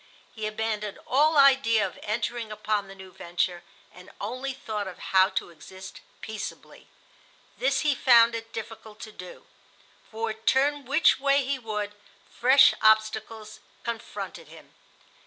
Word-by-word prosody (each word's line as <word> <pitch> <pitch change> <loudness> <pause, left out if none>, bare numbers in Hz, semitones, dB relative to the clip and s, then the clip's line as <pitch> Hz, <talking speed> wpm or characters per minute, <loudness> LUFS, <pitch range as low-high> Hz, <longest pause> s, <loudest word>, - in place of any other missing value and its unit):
He 220 -2 -4
abandoned 215 -1 -3
all 305 +2 +3
idea 265 -6 +5
of - - -8
entering 230 +1 -3
upon 210 -1 -2
the 195 - -11
new 190 -1 -12
venture, 175 -1 -3 0.3
and 180 +1 -14
only 255 +6 -4
thought 215 -6 -5
of 185 - -8
how 190 0 +3
to - - -3
exist 190 +3 -12 0.2
peaceably. 220 -2 -8 0.7
This - - +1
he 300 -2 +2
found 235 -3 +5
it 225 0 -6
difficult 220 -1 -9
to 215 - -8
do, 180 -3 -12 0.6
for, 225 0 -3
turn 270 +6 +1
which 280 +6 +3
way 275 0 +2
he 270 0 -2
would, 210 -3 -4 0.4
fresh 265 +3 +5
obstacles 215 0 +1 0.2
confronted 235 -1 -6
him. - - -16
220 Hz, 140 wpm, -26 LUFS, 210-255 Hz, 0.7 s, idea